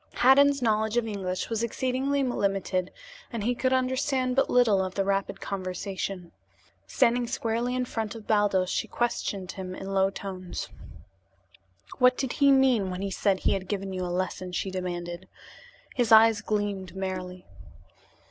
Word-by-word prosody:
Haddan's 275 +1 +5
knowledge 220 0 +1
of 240 - +2
English 190 -4 -3
was 225 -1 -2
exceedingly 260 +4 0
limited, 195 -6 -1 0.4
and 230 -4 -4
he 245 +3 +1
could 255 +1 0
understand 260 0 +1
but 270 - +2
little 220 -6 +4
of 185 0 -5
the 195 - 0
rapid 195 0 -1
conversation. 185 -1 -4 0.6
Standing 245 -1 +2
squarely 240 0 -1
in 255 0 0
front 225 -2 -4
of 220 -2 -10
Baldos, 200 -4 +2
she - - -1
questioned 200 -6 -2
him 185 -1 -6
in 195 +1 -6
low 195 0 +3
tones. 185 -2 -6 1.3
"What 250 0 +5
did 265 -3 -2
he 280 0 +7
mean 260 -7 +4
when 185 +1 -4
he 200 - -3
said 190 0 +1
he - - +2
had 190 -1 -3
given 195 -1 -3
you 185 0 -3
a - - -2
lesson?" 180 0 -3
she 190 +2 -2
demanded. 175 -1 -5 0.7
His 240 -2 0
eyes 220 -1 +7
gleamed 205 -4 -2
merrily. 185 -1 -5
205 Hz, 155 wpm, -27 LUFS, 185-245 Hz, 1.3 s, he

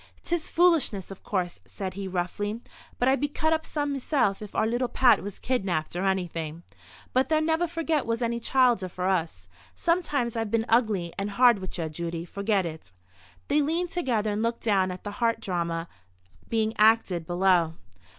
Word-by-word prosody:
"'Tis 340 -2 -2
foolishness, 320 - +2
of 195 - -10
course," 180 -3 -2
said 190 -2 -6
he, 195 0 -5
roughly, 190 +4 -2 0.4
"but 245 - +1
I'd 270 +1 +3
be 290 - +2
cut 315 +2 0
up 320 0 -2
some 290 -2 -1
meself 265 -7 0
if 210 - -9
our - - +2
little 240 +3 0
Pat 250 +1 +4
was 200 0 -6
kidnapped 190 -11 -1
or 180 +2 -1
anything. 170 -4 -2 0.5
But 260 +2 +2
there 310 -1 +3
never 320 +2 +1 0.3
was 230 +1 -1
any 235 0 -1
childer 240 -6 +2
for 180 +1 -3
us. 160 - -1 0.3
Sometimes 295 -9 0
I've 225 -2 -1
been 225 +1 +1
ugly 215 -7 +2
and 200 +1 -2
hard 240 +1 +5
with 185 0 -6
ye, 165 -2 -2
Judy. 170 +1 -4
Forget 200 +1 0
it." 160 - -7 0.6
They 295 +1 +3
leaned 335 +4 -1
together, 235 -11 0
and 205 +1 -1
looked 230 +1 -1
down 195 -4 +2
at 180 0 -7
the 205 - -5
heart 230 -1 +2
drama 170 -4 -2 0.6
being 220 -1 +1
acted 210 -6 +3
below. 175 -2 +2
210 Hz, 180 wpm, -27 LUFS, 180-255 Hz, 0.6 s, hard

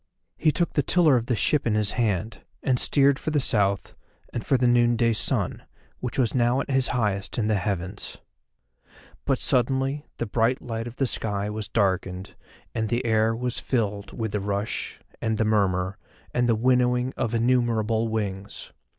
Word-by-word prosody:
He 155 - +2
took 170 +2 -1
the 145 - +3
tiller 155 0 +4
of 120 -1 0
the 125 - +1
ship 140 +4 +1
in 110 - +2
his 105 -1 +1
hand, 110 -2 -1 0.2
and 125 -2 +2
steered 140 -1 +3
for - - -3
the 150 -1 +2
South 100 -7 0 0.4
and 120 - -3
for 135 - +2
the 125 - +1
noonday 120 -1 +3
sun, 105 - 0 0.4
which 125 -1 -4
was 120 -5 +2
now 120 +1 +2
at 140 - -3
his 135 -1 +2
highest 105 -5 -1
in 115 - +1
the 110 - +2
heavens. 95 0 -4 1.1
But 135 - +2
suddenly 135 +3 0
the - - -2
bright 115 +4 +1
light 115 -1 -5
of 120 - -8
the 135 - +1
sky 105 -4 -2
was 105 -1 -4
darkened 95 -3 -1 0.4
and 110 -2 -1
the 120 +1 0
air 110 0 +2
was 125 +1 -2
filled 105 -5 -2
with 110 -3 -3
the 105 - -1
rush, 100 +1 -3 0.2
and 110 -1 0
the 110 - +1
murmur, 95 -3 +1 0.3
and 125 0 +2
the 115 - +4
winnowing 125 +1 +2
of 115 0 -1
innumerable 115 -2 +1
wings. 100 -3 -4
115 Hz, 175 wpm, -25 LUFS, 105-125 Hz, 1.1 s, tiller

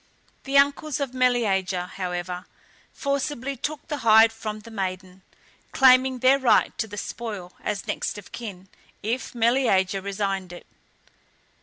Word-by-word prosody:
The 275 +1 +2
uncles 280 +1 +2
of 275 -3 -3
Meleager, 205 -8 +1
however, 180 -1 -5 0.4
forcibly 280 -1 -2
took 295 +3 -5
the 300 -3 -3
hide 225 0 +6
from 215 -1 -6
the 230 - -13
maiden, 185 -2 -5 0.5
claiming 260 0 +5
their 260 +2 +4
right 260 -3 +3
to 220 - -1
the 205 0 -9
spoil 200 -3 -6
as 205 -2 -3
next - - -3
of 205 - -11
kin, 195 -5 -8 0.4
if 240 +4 -3
Meleager 225 -6 +2
resigned 195 -2 -3
it. 175 - -11
225 Hz, 135 wpm, -25 LUFS, 190-260 Hz, 0.5 s, hide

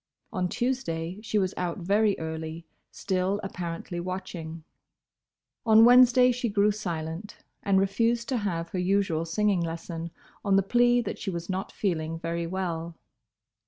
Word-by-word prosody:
On 180 -2 0
Tuesday 205 -9 -2
she 215 -1 -1
was 190 -2 +1
out 175 -2 -2
very 200 +3 +2
early, 160 +1 -5 0.2
still 190 +1 -1
apparently 175 -2 -5
watching. 170 -3 -6 1.0
On 225 0 +7
Wednesday 250 +1 +7
she 245 -1 -1
grew 205 0 +3
silent, 175 -2 -5 0.2
and 195 -2 +3
refused 230 +5 +1
to 260 - +1
have 170 -6 -2
her 185 - -3
usual 180 -3 +1
singing 195 +2 +1
lesson 165 0 -4 0.3
on 200 -1 +3
the 195 - +4
plea 240 +4 +4
that - - -5
she 200 - -3
was 170 0 -4
not 190 +2 -3
feeling 165 -5 -2
very 170 0 -3
well. 170 -2 -3
185 Hz, 145 wpm, -27 LUFS, 165-210 Hz, 1.0 s, On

